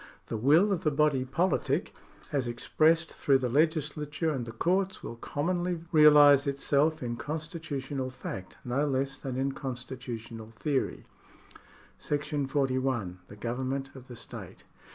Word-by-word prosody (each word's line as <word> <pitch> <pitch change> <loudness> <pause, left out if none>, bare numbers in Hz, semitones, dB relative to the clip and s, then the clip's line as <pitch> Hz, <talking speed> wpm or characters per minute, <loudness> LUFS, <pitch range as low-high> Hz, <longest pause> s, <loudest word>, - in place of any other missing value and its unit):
The - - -4
will 155 - +5
of 185 - 0
the 155 - +3
body 145 -3 +2
politic, 150 +1 0 0.4
as 135 -4 0
expressed 160 +7 +2
through 135 -2 +3
the 130 -2 -1
legislature 150 +2 0
and 125 -5 -3
the - - -5
courts, 185 +10 0
will 115 - -6
commonly 175 +8 -1 0.2
reahse 145 -2 +7
itself 140 +2 +1
in 120 -1 -3
constitutional 145 -4 -4
fact 95 -7 -7
no 135 +4 +1
less 135 0 -1
than 130 -2 -4
in 135 +1 0
constitutional 125 -4 -6
theory. 145 -4 -1 0.9
§ 145 -1 -2
41. 130 -9 0
The - - -11
Government 130 +4 -3
of 130 -1 -12
the 125 - -9
State. - - -9
140 Hz, 135 wpm, -29 LUFS, 130-150 Hz, 0.9 s, reahse